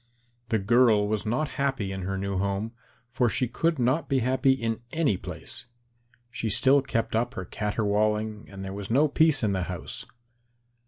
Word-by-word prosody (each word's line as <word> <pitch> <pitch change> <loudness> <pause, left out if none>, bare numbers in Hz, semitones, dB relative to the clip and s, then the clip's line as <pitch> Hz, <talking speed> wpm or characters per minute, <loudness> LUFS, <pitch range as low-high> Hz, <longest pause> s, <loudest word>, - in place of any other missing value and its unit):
The 110 - +2
girl 110 0 +4
was 110 0 -2
not 125 +8 0
happy 135 -8 0
in 95 0 -4
her 95 +1 -3
new 100 -1 -2
home, 100 +3 -1 0.4
for 125 -1 +2
she 125 - 0
would 165 -1 +3
not 130 +6 +1
be 135 - +2
happy 130 +2 +3
in 115 -4 -2
any 160 -10 +1
place. 120 - -8 0.6
She 115 -1 -3
still 135 +6 +4
kept 115 -5 -2
up 120 +3 0
her 90 - -4
caterwauling 105 +1 -1
and 95 -1 -8
there 95 - -5
was 100 0 -6
no 140 +7 +4
peace 155 -2 +3
in 105 -2 +2
the 95 - -1
house. - - -6
115 Hz, 175 wpm, -27 LUFS, 100-130 Hz, 0.6 s, girl